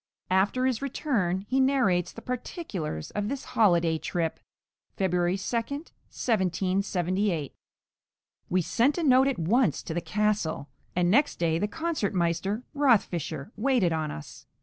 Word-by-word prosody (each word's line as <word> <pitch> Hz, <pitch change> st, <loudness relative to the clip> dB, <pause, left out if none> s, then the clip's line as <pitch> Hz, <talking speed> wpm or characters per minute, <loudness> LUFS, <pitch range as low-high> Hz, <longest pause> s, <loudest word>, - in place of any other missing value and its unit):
After 205 Hz, +7 st, +2 dB
his 260 Hz, -2 st, 0 dB
return 230 Hz, -, -1 dB
he 265 Hz, -, +1 dB
narrates 250 Hz, -11 st, +2 dB
the 230 Hz, -, -11 dB
particulars 210 Hz, -, -4 dB
of 205 Hz, 0 st, -2 dB
this 275 Hz, -1 st, -4 dB
"holi 185 Hz, -7 st, +5 dB
day 165 Hz, -1 st, 0 dB
trip" 165 Hz, -1 st, -2 dB, 0.6 s
(February 180 Hz, -1 st, +1 dB
2, 195 Hz, +5 st, -4 dB
1778) 190 Hz, -, -1 dB, 1.0 s
We 185 Hz, +1 st, +2 dB
sent 260 Hz, -, +2 dB
a 345 Hz, -, -1 dB
note 265 Hz, -2 st, +5 dB
at 275 Hz, -, 0 dB
once 190 Hz, -, +2 dB
to -, -, -5 dB
the 175 Hz, -, -1 dB
castle, 210 Hz, -8 st, -1 dB, 0.3 s
and 175 Hz, 0 st, +2 dB
next 285 Hz, +7 st, +3 dB
day 165 Hz, -1 st, +1 dB
the 205 Hz, -, 0 dB
concertmeister, 205 Hz, -, -1 dB
Rothfischer, 190 Hz, -, +1 dB
waited 220 Hz, -7 st, +2 dB
on 155 Hz, -1 st, -1 dB
us. 75 Hz, -, -9 dB
195 Hz, 135 wpm, -27 LUFS, 175-255 Hz, 1.0 s, holi